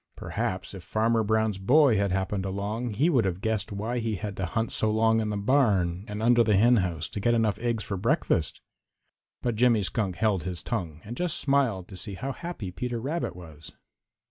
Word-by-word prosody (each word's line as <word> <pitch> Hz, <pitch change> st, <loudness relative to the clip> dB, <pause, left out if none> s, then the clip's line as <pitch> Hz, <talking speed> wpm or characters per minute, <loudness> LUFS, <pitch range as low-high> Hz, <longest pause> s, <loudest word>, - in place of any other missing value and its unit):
Perhaps -, -, -3 dB
if -, -, -8 dB
Farmer 115 Hz, +1 st, +1 dB
Brown's 110 Hz, -1 st, +1 dB
boy 130 Hz, +5 st, +5 dB
had 100 Hz, -1 st, +1 dB
happened 95 Hz, +1 st, -1 dB
along, 105 Hz, +4 st, -3 dB
he 140 Hz, +10 st, +3 dB
would 135 Hz, -9 st, +3 dB
have 90 Hz, -2 st, -2 dB
guessed 110 Hz, -1 st, -2 dB
why 110 Hz, +5 st, -2 dB
he 115 Hz, -2 st, -1 dB
had 100 Hz, +2 st, -5 dB
to 95 Hz, -, -2 dB
hunt 110 Hz, +7 st, -2 dB
so 110 Hz, -, 0 dB
long 110 Hz, +1 st, +3 dB
in 110 Hz, -, -2 dB
the 105 Hz, -, -2 dB
barn 100 Hz, -6 st, +2 dB
and 105 Hz, +1 st, -4 dB
under 120 Hz, 0 st, +5 dB
the 105 Hz, -2 st, +3 dB
henhouse 95 Hz, -8 st, +3 dB
to -, -, -5 dB
get 120 Hz, +4 st, +2 dB
enough 110 Hz, -3 st, +1 dB
eggs 115 Hz, -2 st, -1 dB
for 100 Hz, -, -4 dB
breakfast. 90 Hz, -, 0 dB, 0.8 s
But 120 Hz, -, +1 dB
Jimmy 115 Hz, -3 st, +4 dB
Skunk 95 Hz, -1 st, -1 dB
held 105 Hz, -2 st, +1 dB
his 90 Hz, +1 st, -5 dB
tongue 85 Hz, -9 st, -4 dB
and 115 Hz, +4 st, -7 dB
just 175 Hz, +1 st, -1 dB
smiled 130 Hz, -10 st, +1 dB
to 95 Hz, -, -9 dB
see 100 Hz, +2 st, -7 dB
how 135 Hz, +8 st, -4 dB
happy 150 Hz, -, -6 dB
Peter 120 Hz, +4 st, -3 dB
Rabbit 130 Hz, -, -3 dB
was. 80 Hz, -3 st, -12 dB
110 Hz, 200 wpm, -27 LUFS, 95-120 Hz, 0.8 s, boy